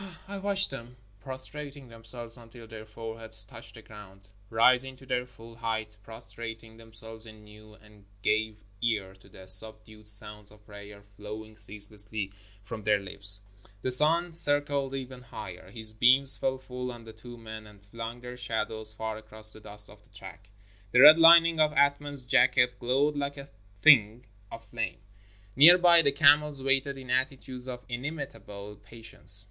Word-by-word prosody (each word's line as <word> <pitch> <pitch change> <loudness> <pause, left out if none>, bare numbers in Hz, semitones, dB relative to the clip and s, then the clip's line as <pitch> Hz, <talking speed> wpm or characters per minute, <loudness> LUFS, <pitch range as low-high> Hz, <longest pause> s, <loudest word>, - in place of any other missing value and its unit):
I 200 0 -6
watched 195 -2 +2
them 125 -2 -10 0.2
prostrating 135 +2 -7
themselves 115 0 -5
until 115 -1 -12
their 110 -1 -11
foreheads 110 0 0
touched 110 +2 -14
the 115 - -14
ground, 100 -2 -15 0.2
rising 125 +3 +3
to 135 - -17
their 125 -1 -3
full 115 -2 -15
height, 110 -2 -4
prostrating 115 +1 -10
themselves 110 0 -6
anew, 105 0 -16
and 105 -2 -21 0.2
gave 110 -1 0 0.2
ear 105 -5 -2
to 95 +1 -22
the 95 0 -15
sub 110 +3 0
dued 110 -1 -17
sounds 105 0 -7
of 105 0 -21
prayer 100 0 -13
flowing 110 +1 -10
ceaselessly 105 -1 -2 0.3
from 110 +2 -8
their 105 0 +2
lips. 100 +1 -7 0.4
The 130 - +3
sun 165 +6 +4
circled 145 -3 +1
ever 130 -1 -8
higher. 95 -7 -10
His 110 +1 -5
beams 130 +4 +7
fell 130 0 -2
full 125 -1 -7
on 120 -1 -12
the 110 -1 -13
two 120 +2 -13
men 110 -1 -10
and 105 -1 -17
flung 115 +3 -8
their 125 0 -9
shadows 110 -2 +1
far 110 0 -5
across 110 0 -2
the - - -12
dust 105 -1 -11
of 105 0 -17
the - - -28
track. 95 0 -13 0.4
The 125 - +5
red 155 +3 +9
lining 165 0 +6
of 150 -1 +2
Athman's 140 -1 0
jacket 125 -1 +2
glowed 135 +5 0
like 140 0 -4
a 140 0 -11 0.3
thing 120 -5 +5 0.3
of 115 0 -10
flame. 95 -3 -5 0.6
Near 165 +6 +8
by, 175 -2 +5
the 140 -3 +1
camels 145 -1 +3
waited 135 +1 0
in 130 -2 -9
attitudes 130 0 -3
of 125 -1 -8
inimitable 115 -7 -8
patience. 110 -3 -1
115 Hz, 165 wpm, -27 LUFS, 105-130 Hz, 0.6 s, red